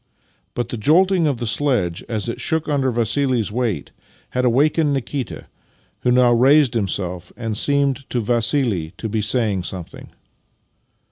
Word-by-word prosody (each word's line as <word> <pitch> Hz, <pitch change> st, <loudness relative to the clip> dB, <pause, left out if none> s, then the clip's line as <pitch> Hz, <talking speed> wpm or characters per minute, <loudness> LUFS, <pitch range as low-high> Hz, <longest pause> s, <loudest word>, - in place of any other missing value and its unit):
But 120 Hz, -, -3 dB
the 120 Hz, -, -4 dB
jolting 175 Hz, -, +3 dB
of 140 Hz, -4 st, 0 dB
the 120 Hz, -, -4 dB
sledge 110 Hz, -8 st, 0 dB
as 110 Hz, -1 st, -3 dB
it 115 Hz, -, -4 dB
shook 160 Hz, -1 st, -1 dB
under 140 Hz, -3 st, +1 dB
Vassili's 120 Hz, -1 st, 0 dB
weight 110 Hz, -, -2 dB, 0.4 s
had 125 Hz, -, -1 dB
awakened 145 Hz, +4 st, +2 dB
Nikita, 135 Hz, -3 st, -4 dB, 0.5 s
who -, -, 0 dB
now 125 Hz, -1 st, +4 dB
raised 135 Hz, +2 st, +4 dB
himself 90 Hz, -5 st, -2 dB
and 110 Hz, -2 st, -3 dB
seemed 140 Hz, +1 st, +1 dB
to 125 Hz, -, -1 dB
Vassili 115 Hz, -, 0 dB
to 110 Hz, -, -4 dB
be 110 Hz, 0 st, -2 dB
saying 110 Hz, -3 st, +1 dB
something. 90 Hz, -1 st, -7 dB
120 Hz, 145 wpm, -20 LUFS, 110-140 Hz, 0.5 s, now